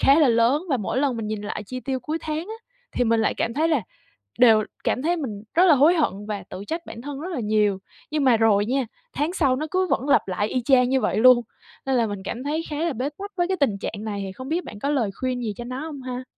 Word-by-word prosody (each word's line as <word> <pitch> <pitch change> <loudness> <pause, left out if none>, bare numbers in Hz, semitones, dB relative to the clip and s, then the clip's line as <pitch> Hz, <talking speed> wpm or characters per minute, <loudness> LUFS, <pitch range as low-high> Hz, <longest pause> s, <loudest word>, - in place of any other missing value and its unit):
khá 275 +3 +6
là 300 -4 +5
lớn. 235 +6 +3
Và 270 - +3
mỗi 235 +3 -2
lần 270 -4 +1
mình 225 - -4
nhìn 215 -1 -3
lại 210 0 -4
chi 255 +4 -5
tiêu 265 -1 -3
cuối 310 +5 -3
tháng 310 -1 -3
á 380 +7 -6 0.4
thì 245 - +2
mình 230 -1 +2
lại 220 - +1
cảm 230 - -1
thấy 315 +4 +2
là 305 -8 +2 0.6
đều 225 -3 +6 0.2
cảm 255 - 0
thấy 345 +4 +1
mình 225 -11 -5
rất 345 +3 +5
là 330 - +7
hối 295 +6 +5
hận 310 - +2 0.2
và 205 -2 -3
tự 185 +2 -7
trách 330 +5 -4
bản 230 - -8
thân 285 0 -6
rất 360 +4 -5
là 285 - -2
nhiều, 210 -2 +1 0.3
nhưng 300 -1 0
mà 250 -3 +5
rồi 215 -2 +3
nha, 260 +1 0 0.3
tháng 295 +5 -1
sau 280 -8 +2
nó 305 +4 -3
cứ 370 0 +1
vẫn 275 - 0
lặp 275 - +3
lại 205 +3 -1
y 255 +1 -1
chang 250 0 +4
như 265 - +2
vậy - - 0
luôn, 245 +2 +7 0.5
nên 265 -1 +2
là 235 -2 +2
mình 205 -2 -5
cảm 240 +6 -5
thấy 310 +3 -1
khá 295 - -3
là 340 - 0
bế 260 +3 -2
tắc 400 +1 -6
với 350 -1 +1
cái 380 - 0
tình 220 -8 +2
trạng 205 +1 -5
này, 205 -2 -3
thì 190 - -6
không 260 +7 -9
biết 335 +4 -1
bạn 210 - -9
có 280 +7 -1
lời 245 -8 +1
khuyên 255 -1 -1
gì 220 -3 -2
cho 240 - -6
nó 255 +2 -5
hông 290 -4 -7
ha? 255 0 -5
255 Hz, 285 wpm, -24 LUFS, 225-300 Hz, 0.6 s, là